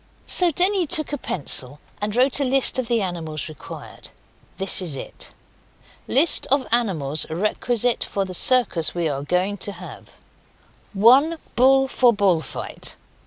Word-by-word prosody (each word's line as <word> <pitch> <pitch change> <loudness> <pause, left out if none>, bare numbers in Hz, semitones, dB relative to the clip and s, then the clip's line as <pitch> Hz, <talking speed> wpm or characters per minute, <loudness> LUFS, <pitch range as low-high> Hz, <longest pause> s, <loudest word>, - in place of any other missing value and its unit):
So 360 -1 +5
Denny 365 +2 +1
took 310 -2 0
a - - -1
pencil 140 - -4 0.2
and 205 +1 -3
wrote 255 +3 +3
a - - +1
list 265 0 +2
of 250 - -3
the 230 -3 0
animals 160 -5 -5
required. 155 -3 -10 0.5
This 195 0 0
is 165 -6 -4
it: - - -7 0.8
LIST 305 +5 +2
OF 275 -1 +1
ANIMALS 160 - +1
REQUISITE 225 +7 -1
FOR 195 -1 -2
THE 185 - -8
CIRCUS 185 -7 +2
WE 170 -2 -1
ARE 140 -2 -3
GOING 180 +7 -1
TO 205 - -5
HAVE 180 0 -12 0.8
1 260 +11 +4 0.2
Bull 270 +2 +4
for 250 -2 +3
bull 195 -6 +2
fight. - - -6
210 Hz, 150 wpm, -22 LUFS, 175-265 Hz, 0.8 s, So